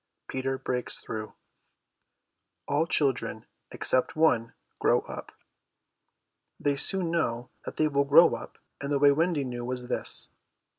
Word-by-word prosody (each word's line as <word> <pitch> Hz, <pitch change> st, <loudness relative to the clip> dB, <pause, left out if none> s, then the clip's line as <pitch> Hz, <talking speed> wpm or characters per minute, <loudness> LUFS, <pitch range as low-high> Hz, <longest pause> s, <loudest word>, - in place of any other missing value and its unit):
PETER 135 Hz, 0 st, -2 dB
BREAKS 125 Hz, -1 st, -2 dB
THROUGH 110 Hz, -1 st, -7 dB, 1.3 s
All 155 Hz, +3 st, +1 dB
children, 130 Hz, -8 st, 0 dB, 0.2 s
except 130 Hz, -, +1 dB
one, 120 Hz, -8 st, +2 dB, 0.2 s
grow -, -, +3 dB
up. -, -, -9 dB, 1.3 s
They 145 Hz, -1 st, +1 dB
soon 175 Hz, +4 st, +3 dB
know 120 Hz, -8 st, -2 dB
that -, -, -7 dB
they 155 Hz, -, +3 dB
will 140 Hz, -1 st, +1 dB
grow 145 Hz, +5 st, +6 dB
up, -, -, -8 dB, 0.2 s
and 140 Hz, 0 st, -4 dB
the 145 Hz, -, +2 dB
way 140 Hz, 0 st, +5 dB
Wendy 160 Hz, 0 st, +1 dB
knew 120 Hz, -2 st, -5 dB
was 125 Hz, 0 st, -4 dB
this. -, -, +1 dB
140 Hz, 135 wpm, -27 LUFS, 125-155 Hz, 1.3 s, grow